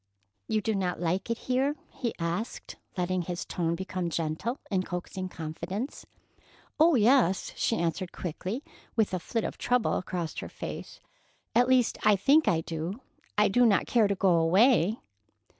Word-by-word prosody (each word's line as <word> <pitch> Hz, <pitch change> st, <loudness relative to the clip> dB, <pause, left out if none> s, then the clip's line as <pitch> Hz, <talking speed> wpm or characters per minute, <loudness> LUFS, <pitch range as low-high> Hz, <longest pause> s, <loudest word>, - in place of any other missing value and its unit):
"You 215 Hz, -, +1 dB
do 220 Hz, +1 st, 0 dB
not 185 Hz, -3 st, -1 dB
like 180 Hz, +5 st, -1 dB
it 230 Hz, -, 0 dB
here?" 265 Hz, +4 st, 0 dB, 0.2 s
he 235 Hz, -3 st, -3 dB
asked, 170 Hz, +7 st, -3 dB, 0.2 s
letting 180 Hz, 0 st, 0 dB
his 175 Hz, 0 st, -4 dB
tone 170 Hz, -1 st, -1 dB
become 185 Hz, -1 st, -3 dB
gentle, 165 Hz, -, -2 dB
in 190 Hz, -2 st, +2 dB
coaxing 185 Hz, +1 st, -5 dB
confidence. 170 Hz, -, -5 dB, 0.7 s
"Oh, 325 Hz, 0 st, +6 dB
yes," 230 Hz, -5 st, +3 dB
she 225 Hz, -, +1 dB
answered 170 Hz, +2 st, -1 dB
quickly, 185 Hz, -, -4 dB, 0.3 s
with 220 Hz, -4 st, +2 dB
a 185 Hz, -, 0 dB
flit 225 Hz, +6 st, -2 dB
of -, -, -4 dB
trouble 245 Hz, -1 st, +1 dB
across 175 Hz, -3 st, -4 dB
her -, -, -6 dB
face. -, -, -7 dB, 0.5 s
"At 245 Hz, +1 st, +4 dB
least, 255 Hz, -2 st, +3 dB
I 210 Hz, -, +6 dB
think 280 Hz, +11 st, +4 dB
I 165 Hz, -2 st, +3 dB
do. 165 Hz, +6 st, -4 dB, 0.4 s
I 210 Hz, -, +5 dB
do 245 Hz, +5 st, +3 dB
not 215 Hz, -5 st, +4 dB
care 230 Hz, -4 st, +3 dB
to 200 Hz, -, 0 dB
go 190 Hz, -1 st, +3 dB
away." 195 Hz, +5 st, +4 dB
190 Hz, 160 wpm, -28 LUFS, 175-230 Hz, 0.7 s, Oh